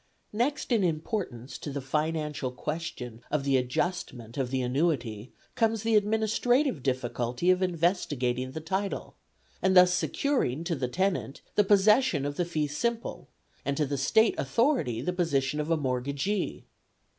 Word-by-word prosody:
Next 260 +6 -1
in 225 -5 +3
importance 155 - -3
to - - -6
the 140 - -3
financial 150 0 -1
question 125 -5 -5
of 150 -1 0
the 140 -1 +2
adjustment 125 -2 -2
of 135 -3 -1
the 130 0 -1
annuity 125 -5 -1 0.2
comes 225 -2 +1
the 225 -1 +2
administrative 220 - +2
difficulty 125 +4 0
of 185 0 +2
investigating 145 -8 0
the 160 - -5
title, 190 +5 -3 0.5
and 190 0 +4
thus 180 0 +7
securing 180 - 0
to 170 - -1
the 130 -3 -2
tenant 180 -1 -1
the 210 - +4
possession 205 - +4
of 145 0 -3
the 175 - 0
fee 155 -3 -1
simple, 230 +11 -3 0.3
and 140 0 -1
to 150 - +2
the 140 +1 -2
State 220 - +3
authority 230 - +1
the 180 +7 -1
position 150 -5 0
of 150 +1 -2
a 165 - +3
mortgagee. 140 +8 -2
155 Hz, 150 wpm, -28 LUFS, 130-195 Hz, 0.5 s, thus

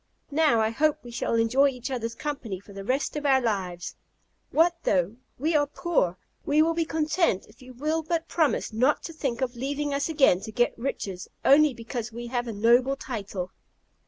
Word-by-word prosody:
Now, 295 -5 +3
I 220 0 +1
hope 300 +5 +2
we 240 - -9
shall 235 0 -1
enjoy 235 +5 +4
each 255 0 -6
other's 230 -2 -3
company 260 -10 -4
for 200 +1 -15
the 195 0 -7
rest 260 +9 -1
of 295 - -3
our 270 -2 +4
lives. 190 -7 -2 0.6
What 340 +2 +3
though 185 +5 +1 0.2
we 310 +5 0
are 290 -1 +3
poor! 280 - 0 0.3
We 300 +2 +4
will 330 +1 +2
be 330 0 0
content 315 - +1
if 210 - -20
you 255 0 -12
will 310 +5 0
but 330 +1 -2
promise 310 -8 0
not 255 +7 +2
to 330 - -6
think 270 -6 -3
of 250 -1 -1
leaving 285 +3 -2
us 280 +3 0
again 280 - +4
to 220 - -7
get 240 +3 +1
riches, 200 -7 -4 0.2
only 290 -1 +6
because 230 0 -5
we 235 +2 -7
have 240 0 -2
a - - -3
noble 240 +5 +3
title." 200 -8 -5
255 Hz, 195 wpm, -26 LUFS, 225-295 Hz, 0.6 s, only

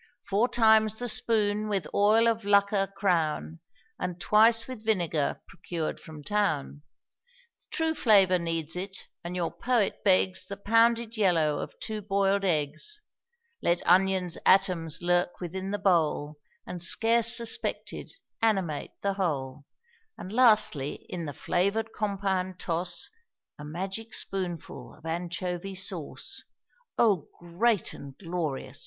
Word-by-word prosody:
Four 210 +5 +3
times 220 -2 +4
the 245 - -2
spoon 215 -2 0
with 195 -6 -1
oil 215 +3 +4
of 225 -1 0
Lucca 200 -1 +2
crown, 165 -4 0 0.4
And 180 -1 -4
twice 225 +5 +4
with 255 -4 -8
vinegar 175 -9 0
procured 170 -3 -5
from 155 -2 -11
town; 155 -7 -1 0.9
True 320 -1 0
flavor 195 - +4
needs 165 -1 -2
it, 190 +1 -5 0.3
and 175 +1 -5
your 175 -2 -1
poet 240 -5 0
begs 185 -1 +3
The 200 0 -6
pounded 230 +2 +2
yellow 165 -7 +2
of - - -7
two 215 -1 -4
boiled 195 0 +1
eggs; 155 - -1 0.6
Let 170 0 +1
onion's 185 -1 +2
atoms 175 -4 +3
lurk 175 0 +1
within 185 +2 -5
the 205 - -1
bowl, 155 -6 +1 0.3
And, 180 - -6
scarce 230 +6 +3
suspected, 230 -1 -3 0.3
animate 190 -9 -1
the 200 0 0
whole; 145 -7 -3 0.5
And, 185 - -8
lastly, 215 - +3
in 175 -2 -4
the 145 - -4
flavored 200 +9 -1
compound 190 -3 -2
toss 170 0 -1 0.5
A - - -8
magic 190 +8 -5
spoonful 180 -4 -4
of 155 - -19
anchovy 175 +3 -4
sauce. 185 -4 -3 0.6
O 200 -10 +3
great 185 +5 0
and 140 -1 -11
glorious! 165 -6 -4
190 Hz, 125 wpm, -28 LUFS, 170-215 Hz, 0.9 s, times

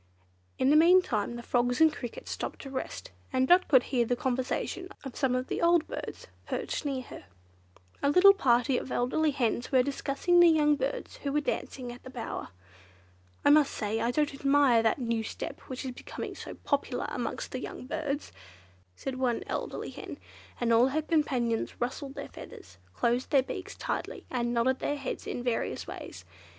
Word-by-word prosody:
In 260 +2 +3
the - - +6
meantime 315 - +4
the 240 - -7
frogs 245 +1 +1
and 320 -1 +6
crickets 240 -6 -7
stopped - - -4
to 270 - -8
rest, 260 - -5 0.2
and 260 -1 +2
Dot 360 +4 +5
could 260 -4 +6
hear 245 -3 +1
the 245 +1 0
conversation 260 +8 -2
of 270 -3 -7
some 265 -3 +1
of 255 0 -1
the - - -3
old 340 -1 +4
birds - - -6 0.2
perched - - -3
near 270 -3 -2
her. - - -11 0.8
A 280 - +3
little 365 +6 +8
party 250 -7 +3
of - - -8
elderly 300 +6 +1
hens 245 -3 -1
were 260 -2 +5
discussing 280 +5 +1
the 345 -1 +8
young 300 -2 +4
birds 270 0 -3
who 280 - -3
were 295 - +2
dancing 255 -3 -3
at 245 - -11
the - - -10
bower. 245 -3 -5 1.0
"I 285 - +7
must 295 -1 +5
say 215 0 -1
I 235 - +1
don't 295 +3 +1
admire 275 -4 +4
that 225 -1 +2
new 230 -3 -1
step 220 - -6
which 255 0 -5
is 260 - -3
becoming 250 - -7
so - - -8
popular - - -1
amongst - - -4
the - - -3
young - - -7
birds," 295 0 -3 0.6
said 260 - -5
one 245 -3 0
elderly - - -4
hen; - - -8 0.4
and 235 -1 +2
all 235 +3 +6
her 305 +4 -1
companions 255 -8 0
rustled 270 +3 -3
their 280 - -6
feathers, 95 -3 -12 0.2
closed 240 - +1
their 275 -2 +4
beaks - - -6
tightly, - - -4
and 240 -2 0
nodded 245 +2 +2
their 290 - -1
heads 270 -2 -5
in 245 - -3
various 245 -2 -1
ways. - - -9
260 Hz, 185 wpm, -29 LUFS, 245-290 Hz, 1.0 s, little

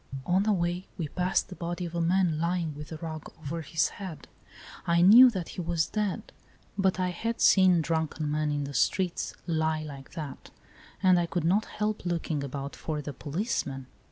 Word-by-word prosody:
On 185 +2 +3
the 215 +1 +2
way 175 -1 -1
we 160 -4 -3
passed 180 +3 0
the 185 - -8
body 175 +1 -4
of 170 - -7
a 170 - -1
man 170 -2 +2
lying 170 -1 -1
with 150 +2 -9
a 160 - -5
rug 155 -1 -7
over 160 +2 -4
his 160 +1 0
head. 185 -5 -8 0.6
I 170 0 +4
knew 235 +7 +10
that 185 -7 -4
he - - -5
was 170 -2 0
dead; 210 -3 -3 0.4
but 190 -1 +1
I 180 0 +1
had 230 +6 -3
seen 185 -3 +6
drunken 160 -1 -1
men 150 0 0
in 145 -1 -1
the 140 0 -6
streets 185 +4 0
lie 160 -2 0
like 140 -3 -9
that, 155 -5 -7 0.5
and 185 -1 +6
I 170 - 0
could 175 -1 -2
not 200 +6 +3
help 210 0 -3
looking 165 -4 -2
about 140 +1 -5
for 155 -2 -4
the 145 0 -5
policeman. 145 - -3
170 Hz, 190 wpm, -28 LUFS, 155-185 Hz, 0.6 s, knew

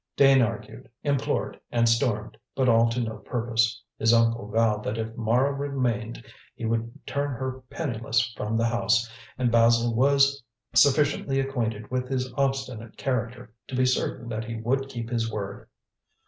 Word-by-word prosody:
Dane 135 -1 +6
argued, 110 +1 -3
implored 140 -2 -1
and 115 -1 +3
stormed, 115 -2 +1 0.2
but 130 -1 +2
all 115 -1 +5
to 115 +2 -2
no 110 -2 -3
purpose. 115 -1 0 0.2
His 115 +1 +4
uncle 115 -2 +2
vowed 110 -1 +1
that 110 - -3
if 115 0 -4
Mara 120 +5 +2
remained, 125 -5 -2 0.3
he 115 - -5
would 115 +1 -3
turn 145 0 -1
her 130 +1 -4
penniless 120 -4 -1
from 105 +2 -2
the 115 - +2
house, 115 0 +2 0.3
and 125 -2 +1
Basil 115 0 +4
was 140 +3 +3 0.3
sufficiently 140 -1 +3
acquainted 115 -6 -2
with 125 0 -2
his 130 -1 -2
obstinate 135 -4 -2
character 125 -3 -3
to 130 - -5
be 130 0 +3
certain 125 -1 -1
that 110 -1 -3
he 115 0 -5
would 135 +5 -1
keep 120 -3 -5
his 115 -2 -1
word. 100 -3 -6
120 Hz, 160 wpm, -26 LUFS, 115-130 Hz, 0.3 s, Dane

